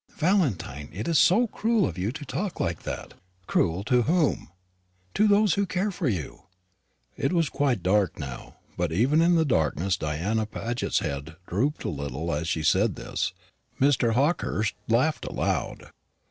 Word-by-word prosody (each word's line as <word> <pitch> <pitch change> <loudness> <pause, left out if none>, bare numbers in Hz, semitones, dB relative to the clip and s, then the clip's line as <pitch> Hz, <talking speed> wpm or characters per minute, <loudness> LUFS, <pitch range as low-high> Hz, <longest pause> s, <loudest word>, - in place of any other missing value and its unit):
"Valentine, 145 - 0
it 100 +7 -5
is 165 -4 +3
so 185 - +5
cruel 225 -2 +1
of 85 - -5
you 95 +4 -2
to 145 +2 -8
talk 185 +7 -4
like 85 -1 -1
that." - - -6 0.3
"Cruel 90 +1 +1
to 125 +3 +3
whom?" 160 +4 +1 0.6
"To 215 - +3
those 205 -1 +4
who 200 -1 0
care 190 +4 -1
for 180 -7 -1
you." 85 - -5 0.7
It 135 - -1
was 165 -5 +2
quite 130 -9 0
dark 95 -2 +2
now; 65 -5 -7 0.2
but 85 -2 -1
even 130 - +3
in 175 +1 +4
the 160 -1 +3
darkness 90 - +1
Diana 90 +9 -1
Paget's 120 +2 -2
head 70 +2 -5
drooped 130 - -1
a - - -2
little 70 +3 -3
as 75 +3 -2
she 80 -2 -1
said 95 +5 +3
this. - - -3 0.5
Mr. 130 -4 +3
Hawkehurst 125 - +1
laughed 130 +8 +1
aloud. - - -2
115 Hz, 160 wpm, -26 LUFS, -, 0.7 s, so